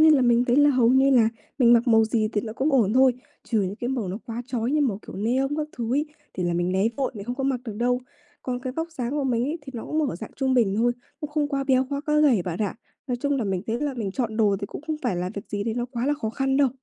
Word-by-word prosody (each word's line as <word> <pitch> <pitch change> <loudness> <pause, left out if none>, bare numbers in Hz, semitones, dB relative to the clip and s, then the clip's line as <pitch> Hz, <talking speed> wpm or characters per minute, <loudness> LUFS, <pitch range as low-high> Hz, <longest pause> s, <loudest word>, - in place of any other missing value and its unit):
nhiên 315 0 +7
là 265 - +2
mình 240 0 +4
thấy 245 +1 +2
là 290 0 +6
hầu 250 -4 +3
như 265 +2 +5
là 235 -4 +5 0.3
mình 240 -3 +6
mặc 240 +1 +4
màu 225 -1 +6
gì 220 -1 0
thì 205 - +1
nó 220 - -6
cũng 275 +6 0
ổn 225 -7 +3
thôi. 260 +1 +5 0.3
Trừ 225 -3 +1
những 190 +2 -3
cái 240 - -3
màu 250 -7 -2
nó 190 +3 -4
quá 235 +1 -4
chói 245 -2 -1
như 300 +1 +2
màu 240 -9 +1
kiểu - - -8
neon 245 +7 +1
các 305 -1 -2
thứ 235 0 -1
ấy, 295 +2 +1 0.3
thì 185 - -3
là 175 - 0
mình 175 +1 0
né 190 +2 +2
vội, 270 -1 -1
mình 200 -2 -7
không 245 +3 -3
có 270 - -3
mặc 265 -2 0
được 225 - -5
đâu. 245 +2 +1 0.4
Còn 250 -1 -3
cái 255 0 -4
vóc 325 +4 -4
dáng 245 -6 -3
của 290 0 -1
mình 240 -2 +1
ấy, 305 +5 -2
thì 270 - -9
nó 230 - -5
cũng 310 -2 0
ở - - -5
dạng 220 +4 -8
trung 265 -1 +1
bình 220 -6 +3
thôi, 240 +2 +3 0.3
cũng 300 - -5
không 295 -1 0
quá 275 -1 -1
béo, 260 -1 +3
quá 280 - -1
quá 300 0 +3
gầy 260 -11 +4
bạn 175 0 -4
ạ. 205 -3 -1 0.3
Nói 250 - -1
chung 285 +3 0
là 245 - -1
mình 190 -2 -1
thấy 230 +2 -2
là 290 -2 -1
mình 220 -6 -3
chọn 225 -3 -2
đồ 205 -3 +3
thì 200 - -3
cũng 265 - -8
không 315 -1 -1
phải 240 -8 0
là 180 +1 -2
việc 200 - -6
gì 205 -1 -3
đấy 225 0 -1
nó 240 0 -1
quá 240 0 -2
là 295 - +2
khó 225 -7 -3
khăn 270 +3 0
đâu. 280 -2 +4
245 Hz, 315 wpm, -25 LUFS, 220-275 Hz, 0.4 s, nhiên